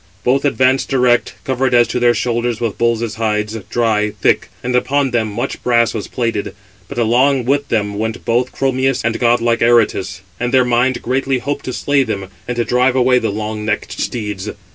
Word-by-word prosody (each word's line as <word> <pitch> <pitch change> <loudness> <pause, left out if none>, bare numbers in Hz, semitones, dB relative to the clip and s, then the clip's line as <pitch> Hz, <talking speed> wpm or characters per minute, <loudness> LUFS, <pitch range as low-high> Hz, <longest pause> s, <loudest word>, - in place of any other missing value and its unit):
Both 135 +3 +1
advanced 130 -1 +2
direct, 125 -3 +2
covered 130 -1 0
as 120 -1 +5
to 125 - -1
their 120 -1 +3
shoulders 120 -1 -1
with 115 -4 -3
bulls' 115 -1 0
hides, 105 -1 -1 0.2
dry, 110 -3 +1
thick; - - +1
and 125 0 -1
upon 135 +2 +1
them 115 -2 +1
much 115 +4 -4
brass 120 -2 +2
was 110 - -4
plated. 115 -5 -3 0.3
But - - -9
along 125 +3 +2
with 140 +2 +1
them 105 -2 -1
went 110 +1 -3
both 120 +2 +1
Chromius 135 -1 0
and 115 -1 0
god 120 -1 +3
like 115 0 +1
Aretus: 115 -5 +2 0.2
and 125 0 -1
their 130 -1 +4
mind 125 +1 +1
greatly 135 +1 0
hoped 140 +3 -4
to 130 - -3
slay 145 +2 +1
them, 100 -6 -3 0.2
and 125 - -2
to 120 - 0
drive 125 +1 +2
away 125 0 +4
the 115 - -1
long 105 +1 -4
necked 105 -1 -2
steeds. 105 -4 -4
120 Hz, 190 wpm, -17 LUFS, 110-130 Hz, 0.3 s, as